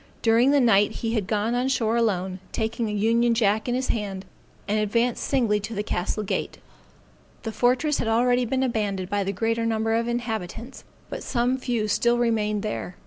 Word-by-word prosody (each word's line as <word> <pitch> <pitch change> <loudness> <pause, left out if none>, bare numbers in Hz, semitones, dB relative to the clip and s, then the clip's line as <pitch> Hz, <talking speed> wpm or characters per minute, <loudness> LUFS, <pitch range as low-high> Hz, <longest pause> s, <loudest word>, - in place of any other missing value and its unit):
During 230 +3 +4
the 285 0 +4
night 210 -5 +4
he 225 0 0
had 210 -5 -1
gone 215 +2 0
on 250 +1 0
shore 230 -4 +1
alone, 190 -5 0
taking 225 0 -2
an 210 - -2
union 230 +3 +2
jack 220 +1 +1
in 245 - +1
his 255 0 -2
hand, 200 -3 -3 0.4
and 210 +1 +1
advanced 230 +3 0
singly 230 -6 +1
to 215 +3 -6
the 205 - -2
castle 210 +2 -2
gate. 195 - -3 0.9
The 225 - -3
fortress 250 +7 +1
had - - -1
already 245 +2 +2
been 260 +3 0
abandoned 205 -6 -2
by 205 -1 +1
the 195 - -2
greater 225 +3 -1
number 225 0 0
of 230 +1 +1
the 240 - -2
inhabitants, 230 +1 -5 0.3
but - - -5
some 245 0 0
few 235 -4 -1
still 235 +3 +2
remained 215 -3 0
there. 210 -3 -4
225 Hz, 195 wpm, -25 LUFS, 210-240 Hz, 0.9 s, During